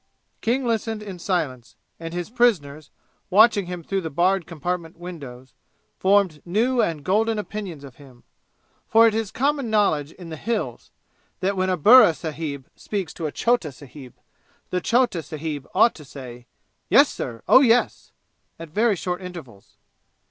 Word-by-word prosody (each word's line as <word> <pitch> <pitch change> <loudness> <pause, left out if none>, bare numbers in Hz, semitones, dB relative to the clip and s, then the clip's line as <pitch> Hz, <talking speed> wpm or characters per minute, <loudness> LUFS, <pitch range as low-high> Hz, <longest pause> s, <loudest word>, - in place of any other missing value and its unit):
King 250 +3 0
listened 225 -2 -2
in 195 -4 -8
silence, 155 - -3 0.2
and 165 0 -6
his 175 +4 -5
prisoners, 165 -12 +1 0.4
watching 205 -1 +5
him 180 -1 -6
through 195 +3 -2
the 160 - -4
barred 180 +3 +1
compartment 170 +1 -4
windows, 135 -8 -10 0.5
formed 190 -6 +2
new 235 +8 +1
and 155 -4 -2
golden 220 +3 +1
opinions 200 -7 -6
of 135 -4 -12
him, 130 -4 -17 0.6
for 225 +1 +6
it 225 - +3
is 220 -2 -2
common 275 +1 -1
knowledge 160 -9 +1
in 175 -3 -11
the 160 - -7
"Hills" 230 +7 -4 0.5
that 195 +2 0
when 185 0 0
a 185 - +1
burra 210 - +7
sahib 150 -4 -6
speaks 195 -5 -5
to 160 - -4
a - - -5
chota 235 -8 0
sahib, 135 -1 -13 0.6
the 180 - -1
chota 235 -5 +1
sahib 150 -2 -6
ought 230 +4 +5
to 155 - -13
say, 125 -3 -11 0.4
"Yes, - - +6
sir, 115 -1 -6
oh, 260 - +7
yes!" 245 -2 +2 0.5
at 165 -1 -9
very 215 +4 +2
short 180 +1 -4
intervals. 160 - -11
180 Hz, 155 wpm, -23 LUFS, 150-215 Hz, 0.6 s, burra